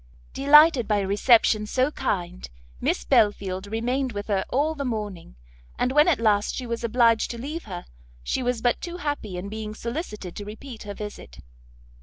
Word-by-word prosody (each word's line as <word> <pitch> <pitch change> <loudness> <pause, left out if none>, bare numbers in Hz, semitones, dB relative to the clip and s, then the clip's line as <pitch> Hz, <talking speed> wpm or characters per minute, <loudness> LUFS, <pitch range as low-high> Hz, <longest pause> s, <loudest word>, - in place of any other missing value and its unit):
Delighted 285 -2 +6
by 210 - +2
a 195 -1 -1
reception 215 +1 +4
so 260 +5 +1
kind, 180 -8 -3 0.3
Miss 65 - 0
Belfield 190 - +1
remained 245 +4 -1
with 205 +1 -6
her 195 -2 +1
all 295 +5 +1
the 285 -3 -4
morning; 210 - -5 0.4
and 250 - +1
when 295 +4 +5
at 320 -9 +3
last 210 -2 +2
she 255 - -4
was 235 0 -4
obliged 230 -1 +3
to 235 - -5
leave 300 +8 -6
her, 180 -4 -7 0.4
she 260 - -1
was 245 -2 -1
but 245 -1 +1
too 345 0 -5
happy 290 - -4
in 180 +2 -5
being 215 0 -6
solicited 220 - -5
to 205 - -5
repeat 220 +4 -9
her 205 -1 -7
visit. 205 - -8
225 Hz, 180 wpm, -25 LUFS, 205-260 Hz, 0.4 s, Delighted